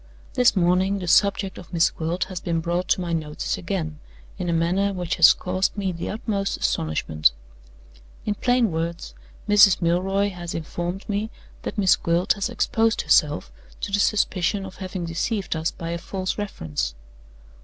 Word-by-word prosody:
"This 250 -4 +4
morning 185 +2 +2
the 180 -2 -5
subject 195 +1 +2
of 180 - -13
Miss 170 -1 +3
Gwilt 165 +3 -2
has 185 -1 -6
been 170 -1 -1
brought 175 +2 -1
to 185 - +2
my 170 -1 -2
notice 155 -2 -2
again 160 -5 -4 0.4
in 180 -1 -2
a - - +2
manner 180 +5 +1
which 180 -2 -2
has 170 -1 +9
caused 185 +3 -1
me 195 -2 -1
the 170 -1 -5
utmost 205 -2 -2
astonishment. 75 -3 +1 0.9
In 210 - +1
plain 245 -1 +2
words, 165 +1 -3 0.3
Mrs. 205 -2 +6
Milroy 190 +4 +1
has 175 -2 -6
informed 175 +3 -4
me 210 +1 -1 0.3
that - - -5
Miss 195 -3 +5
Gwilt 170 +2 +1
has 200 -2 -2
exposed 225 0 +1
herself 150 0 +2 0.3
to 205 - -3
the 205 - +1
suspicion 195 -1 +1
of 190 - -10
having 185 -2 -5
deceived 185 +4 -2
us 160 +1 0
by 165 0 -6
a 170 - -3
false 185 +1 -3
reference. 75 - -3
180 Hz, 165 wpm, -24 LUFS, 170-200 Hz, 0.9 s, has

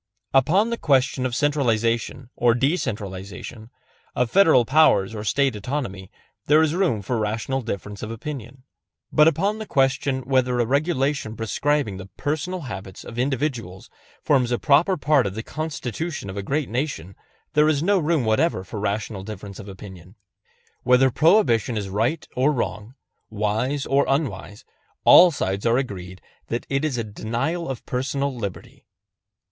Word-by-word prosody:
Upon 180 - +3
the 235 - -2
question 135 -3 +2
of 120 - -5
centralization 120 -4 0
or 120 -1 +3
decentralization, 110 - -3 0.5
of 125 -2 0
Federal 160 -11 +5
power 150 -6 +5
or 105 -1 -5
State 135 +3 +1
autonomy, 105 -4 -4 0.4
there 155 +2 +5
is 155 -1 +1
room 165 - 0
for 120 +4 -1
rational 110 +5 -2
difference 105 -2 -6
of 110 - -5
opinion. 125 +1 -7 0.5
But 150 0 +6
upon 195 +7 +1
the 220 - -6
question 135 -1 +1
whether 125 -1 +1
a 120 - +2
regulation 140 -3 0
prescribing 115 0 -1
the 95 0 -9
personal 160 +5 -2
habits 95 - -8
of 120 - -8
individuals 125 -8 -2 0.3
forms 130 -5 +2
a 120 - +2
proper 160 +8 +3
part 145 -6 +2
of 95 - -6
the 110 - -4
Constitution 155 - -4
of - - -9
a 100 - -3
great 140 +8 -1
nation 115 - -4 0.4
there 150 +1 +4
is 150 -1 +1
no 200 +2 +3
room 155 -5 +1
whatever 110 - +1
for 100 +3 -7
rational 105 0 -2
difference 100 -1 -8
of 100 -2 -9
opinion. 95 -1 -12 0.7
Whether 125 +1 +4
Prohibition 130 - +3
is 100 -2 -3
right 115 - -1
or 130 +4 +3
wrong, 120 -3 -4 0.3
wise 110 +7 -1
or 140 +1 +2
unwise, 105 - -2 0.4
all 180 - +9
sides 100 - -2
are 115 +1 +3
agreed 95 -8 -5 0.3
that 120 - -3
it 135 +1 0
is 150 -5 -1
a 115 - -1
denial 120 +11 -3
of 130 - -6
personal 135 +2 -2
liberty. 100 -6 -7
125 Hz, 155 wpm, -23 LUFS, 105-145 Hz, 0.7 s, all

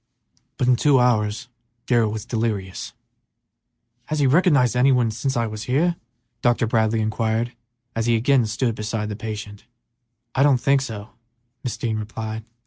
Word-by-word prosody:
But 125 - 0
in 125 -1 +4
two 140 0 +4
hours 115 -1 +1 0.4
Darrell 115 -4 +2
was 110 0 -5
delirious. 110 -6 -3 1.1
"Has 155 - -2
he 145 - +2
recognized 140 -4 +4
any 130 +2 +4
one 120 -3 +2
since 120 +4 -2
I 115 - +1
was 110 +1 -6
here?" 155 +7 +2 0.5
Dr. 120 -1 +2
Bradley 110 0 +1
inquired, 110 +2 -1 0.4
as 115 0 -1
he 120 - +4
again 120 +1 +3
stood 115 +2 0
beside 110 0 -3
the 105 - -4
patient. 105 -1 -7 0.7
"I 130 - +1
don't 140 -2 +5
think 135 +2 +2
so," 110 -5 -6 0.5
Mrs. 125 - -3
Dean 110 -2 -1
replied. 110 +1 -5
115 Hz, 155 wpm, -23 LUFS, 110-125 Hz, 1.1 s, don't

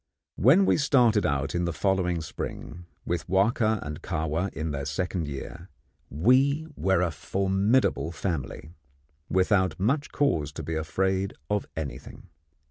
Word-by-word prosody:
When 150 - +5
we - - +3
started 125 -8 +3
out 70 0 -1
in 85 0 0
the 85 - -1
following 90 0 0
spring, 85 +2 -7 0.2
with 85 -3 -2
Wahka 110 +3 +2
and 75 0 -6
Kahwa 80 +5 -2
in 80 +1 -4
their 70 -1 -3
second 85 +2 -2
year, 70 -2 -7 0.4
we 130 - +3
were 95 -2 +2
a 85 - 0
formidable 95 - +1
family, 80 -3 -4 0.6
without 95 0 +2
much 140 +9 0
cause 80 - +1
to - - -6
be 80 - -4
afraid 95 +5 -1 0.2
of 105 -1 0
anything. 75 -4 -7
95 Hz, 135 wpm, -27 LUFS, 80-105 Hz, 0.6 s, When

